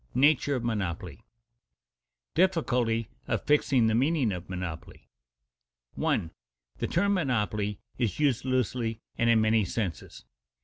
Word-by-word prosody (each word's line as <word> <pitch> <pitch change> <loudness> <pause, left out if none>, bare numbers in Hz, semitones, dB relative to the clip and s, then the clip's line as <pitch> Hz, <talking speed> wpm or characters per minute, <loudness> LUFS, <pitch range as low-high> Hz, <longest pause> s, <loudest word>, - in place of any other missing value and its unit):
NATURE 145 +1 +4
OF 125 - -3
MONOPOLY 105 -8 -2
[Sidenote: - - -29 1.1
Difficulty 125 - +1 0.2
of - - -1
fixing 135 -5 +3
the 110 - +2
meaning 135 0 +2
of 90 -1 -6
monopoly] 90 -3 -6 0.9
1. 80 - 0 0.5
_The - - -2
term 200 +4 +2
monopoly 105 - 0 0.2
is 120 -1 -1
used 140 -6 +2
loosely 125 -3 -1 0.2
and 115 - +3
in 115 -1 +5
many 110 0 +3
senses. 95 -2 -4
115 Hz, 125 wpm, -28 LUFS, 105-140 Hz, 1.1 s, in